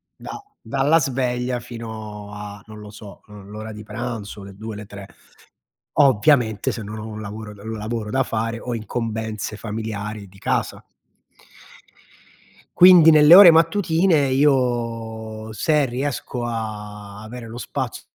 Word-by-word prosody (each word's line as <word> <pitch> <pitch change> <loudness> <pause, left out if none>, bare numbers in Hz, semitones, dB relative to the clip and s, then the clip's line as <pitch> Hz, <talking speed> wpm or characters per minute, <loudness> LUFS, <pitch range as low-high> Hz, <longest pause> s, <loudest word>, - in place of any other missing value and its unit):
da - - -9 0.2
dalla 140 +4 +2
sveglia 125 -2 -1
fino 110 -3 -8
a, 105 0 -8
non 105 -1 -11
lo 105 0 -11
so, 105 -1 -12
uhm, 105 -1 -13
l'ora 110 +1 -7
di 105 - -9
pranzo, 105 -2 -6
le 100 -1 -11
2, 110 +1 -7
le 105 0 -8
3, 100 -1 -10 0.9
ovviamente, 125 -4 +3
se 115 - -6
non 105 +1 -7
ho 110 - -7
un 110 -1 -7
lavoro, 105 +1 -7
ehm, 110 +2 -7
lavoro 110 0 -4
da 135 +1 +1
fare 115 +1 -3
o 120 -1 -4
incombenze 110 -1 -4
familiari 105 -2 -5
di 95 +1 -19
casa. - - -2 2.0
Quindi, 175 -3 +9
nelle 155 +2 +8
ore 190 -4 +11
mattutine, 165 -2 +3
io, 115 -5 -1
se 150 +6 +1
riesco 125 -1 -3
a 105 -2 -6
avere 115 +2 -9
lo 115 +2 -9
spazio - - -5
110 Hz, 140 wpm, -22 LUFS, 105-125 Hz, 2.0 s, ore